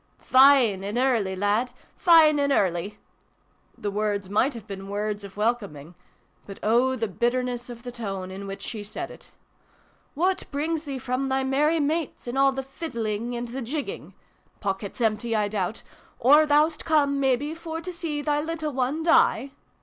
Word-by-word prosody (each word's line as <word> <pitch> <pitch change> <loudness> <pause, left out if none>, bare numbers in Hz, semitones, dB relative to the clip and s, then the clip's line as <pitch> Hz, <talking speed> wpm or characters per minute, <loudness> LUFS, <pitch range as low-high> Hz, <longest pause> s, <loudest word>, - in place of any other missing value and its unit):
" - - -40
Fine 255 -7 +5
an' 205 +4 -3
early, 235 -7 +1
lad! 205 +6 +1 0.3
Fine 320 -4 +6
an' 280 0 +1
early! 195 -2 0 0.4
" - - -39
The 205 - -3
words 205 -2 -2
might 245 +6 +2
have 225 -3 -9
been 195 -1 -8
words 205 0 -3
of 200 0 -11
welcoming, 200 -9 -2 0.5
but 195 - -8
oh, 245 +4 +3
the 225 -3 -2
bitterness 245 +3 -1
of 240 -1 -9
the 245 - -6
tone 195 -6 -5
in 195 +1 -7
which 195 0 -7
she 215 -3 -5
said 215 +12 -6
it! - - -14 0.9
"What 365 +5 0
brings 310 +2 -2
thee 275 -2 -4
from 255 +2 -2
thy 265 0 0
merry 295 +5 +2
mates, 310 +1 -2
and 240 +1 -4
all 275 0 +4
the 270 0 -4
fiddling 235 -5 -4
and 240 0 -4
the 260 +3 -5
jigging? 300 - -5 0.4
Pockets 200 +3 -4
empty, 225 +1 0
I 210 -1 +1
doubt? 205 0 -3 0.3
Or 295 +5 +6
thou'st 300 +2 +3
come, 285 -3 +2
mebbe, 275 +3 +1
for 325 -1 -6
to 360 +2 -7
see 320 -4 -4
thy 295 0 +1
little 315 -1 -3
one 265 +5 -1
die 275 -5 +3
250 Hz, 175 wpm, -25 LUFS, 210-290 Hz, 0.9 s, Fine